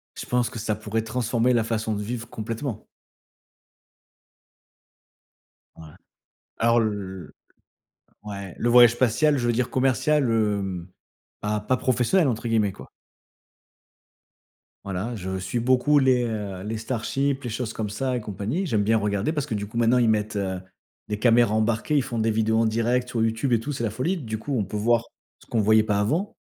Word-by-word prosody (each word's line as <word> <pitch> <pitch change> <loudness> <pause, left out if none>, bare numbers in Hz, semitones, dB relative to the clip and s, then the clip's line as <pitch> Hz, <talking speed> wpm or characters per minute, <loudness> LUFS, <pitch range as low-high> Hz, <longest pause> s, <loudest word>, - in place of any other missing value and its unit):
Je - - -6
pense 125 -1 +1
que 115 - -7
ça 110 0 -1
pourrait 110 +1 -2
transformer 120 +1 0
la 115 -2 +2
façon 110 -1 -2
de 105 - -3
vivre, 115 +1 -5
complètement. 115 +1 -5 2.9
Ouais. 80 - -12 0.7
Alors 115 +1 +3
le 100 -4 -3 0.9
ouais. 100 -3 -7
Le 120 - 0
voyage 120 -1 +8
spatial, 130 +5 +2
je 120 -1 -1
veux 120 - +2
dire 125 +1 0
commercial 135 +3 +2
hem, 100 -6 0 0.5
bah, 105 0 -1
«pas 130 - +2
professionnel» 130 +9 +2
entre 115 0 -3
guillemets 110 -3 +2
quoi. - - -13 1.9
Voilà, 100 +5 -4
je 95 -2 -4
suis 95 +6 -3
beaucoup 130 +4 +3
les, 130 -2 +3
heu, 105 -5 -4
les 110 +2 -3
Starships 130 +4 -2
les 120 - -3
choses 115 +1 -3
comme 110 -2 -4
ça 125 +4 -2
et - - -2
compagnie. 105 - -3
J'aime 110 - +1
bien 110 +2 +3
regarder 100 +6 0
parce 150 -4 -2
que 110 - -3
du 100 - -3
coup 110 +3 -8
maintenant 120 +1 +4
ils 120 -2 +3
mettent, 105 -1 0
heu, 95 -2 -2 0.5
des 105 -1 -2
caméras 120 -2 +4
embarquées. 115 +7 0
Ils 140 - +4
font 120 -3 -4
des 110 0 +2
vidéos 110 +1 +1
en 115 - +3
direct 115 +3 +1
sur 115 -2 0
YouTube 115 +3 0
et 115 - +4
tout, 145 - -4
c'est 125 -4 -4
la 115 - +1
folie. 130 - -1
Du 110 -7 -4
coup, 135 +3 -3
on 105 - 0
peut 95 - -7
voir 115 +2 +2 0.3
ce - - -21
qu'on 115 - +1
voyait 110 +1 +5
pas 105 -1 0
avant. 160 - -1
115 Hz, 180 wpm, -24 LUFS, 105-125 Hz, 2.9 s, voyage